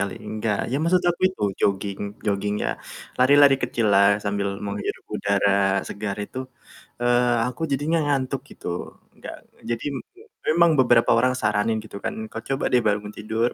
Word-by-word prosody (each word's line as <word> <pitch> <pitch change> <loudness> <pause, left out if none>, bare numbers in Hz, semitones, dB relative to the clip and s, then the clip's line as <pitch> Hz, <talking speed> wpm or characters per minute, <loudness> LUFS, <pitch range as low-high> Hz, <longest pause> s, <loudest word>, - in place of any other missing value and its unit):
kali, 100 -2 -2
enggak? 110 -1 -2
Ya, - - +1
maksud 180 +2 +3
aku 175 - -5
itu, 185 - -4 0.2
jogging 100 0 0 0.3
joggingnya, 105 0 -1 0.5
lari-lari 140 +2 +6
kecil 115 -2 0
lah 100 +1 +5
sambil 100 -1 -2
menghirup 100 0 -4
udara 100 -1 +2
segar 100 -1 -4
itu, 105 +5 -5 0.6
eee, 120 0 +3
aku 125 +6 -7
jadinya 145 +5 +1
ngantuk, 135 -2 -1
gitu. 90 0 -7
Enggak - - -9 0.3
jadi 115 0 -3
m - - -3 0.5
memang 170 +1 +5
beberapa 120 -3 +5
orang 125 +2 +2
saranin 105 -1 +1
gitu 105 -2 -8
kan, 220 +1 -4
"Kau - - -6
coba 135 +1 -2
deh 125 - +5
bangun 105 -1 -1
tidur, 110 +3 -1
110 Hz, 155 wpm, -23 LUFS, 100-130 Hz, 0.6 s, lari-lari